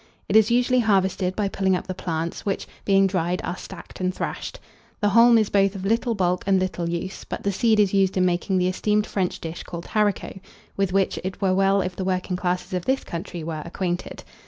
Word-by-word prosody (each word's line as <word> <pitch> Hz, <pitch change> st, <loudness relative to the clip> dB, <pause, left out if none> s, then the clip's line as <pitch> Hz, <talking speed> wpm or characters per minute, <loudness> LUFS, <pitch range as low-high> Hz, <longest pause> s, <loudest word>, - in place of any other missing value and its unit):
It 200 Hz, -, -1 dB
is 220 Hz, 0 st, +6 dB
usually 250 Hz, +1 st, +3 dB
harvested 190 Hz, -4 st, +1 dB
by 205 Hz, -2 st, 0 dB
pulling 190 Hz, -1 st, +1 dB
up 180 Hz, -, -4 dB
the 185 Hz, -, -4 dB
plants, 170 Hz, -2 st, -4 dB
which, 195 Hz, -, -2 dB, 0.2 s
being 195 Hz, -1 st, +4 dB
dried, 180 Hz, -2 st, 0 dB
are 175 Hz, -, -3 dB
stacked 190 Hz, -1 st, -11 dB
and 185 Hz, 0 st, 0 dB
thrashed. -, -, -5 dB, 0.4 s
The 205 Hz, -, +2 dB
haulm 230 Hz, +3 st, +6 dB
is 215 Hz, -2 st, +1 dB
both 195 Hz, 0 st, +3 dB
of 190 Hz, 0 st, -5 dB
little 230 Hz, +3 st, +1 dB
bulk 180 Hz, -2 st, 0 dB
and 195 Hz, -1 st, +4 dB
little 180 Hz, -2 st, -2 dB
use, 175 Hz, +3 st, -4 dB
but -, -, -6 dB
the 200 Hz, -, +1 dB
seed 220 Hz, +2 st, +2 dB
is 205 Hz, -2 st, +3 dB
used 195 Hz, -1 st, +2 dB
in 185 Hz, -, +3 dB
making 180 Hz, +2 st, 0 dB
the 180 Hz, 0 st, +2 dB
esteemed 210 Hz, +3 st, +1 dB
French 185 Hz, -3 st, -2 dB
dish 165 Hz, +1 st, -6 dB
called 170 Hz, -1 st, -7 dB
haricot, 210 Hz, -3 st, -1 dB, 0.4 s
with 195 Hz, -2 st, 0 dB
which 195 Hz, 0 st, +1 dB
it 185 Hz, 0 st, -5 dB
were 190 Hz, -2 st, +2 dB
well 195 Hz, +1 st, +3 dB
if 185 Hz, -1 st, -4 dB
the 190 Hz, -, -3 dB
working 185 Hz, 0 st, -1 dB
classes 180 Hz, +1 st, -2 dB
of 180 Hz, -1 st, -2 dB
this 265 Hz, +1 st, +1 dB
country 170 Hz, 0 st, -6 dB
were 155 Hz, -1 st, -4 dB
acquainted. 175 Hz, +1 st, -4 dB
190 Hz, 220 wpm, -24 LUFS, 180-200 Hz, 0.4 s, is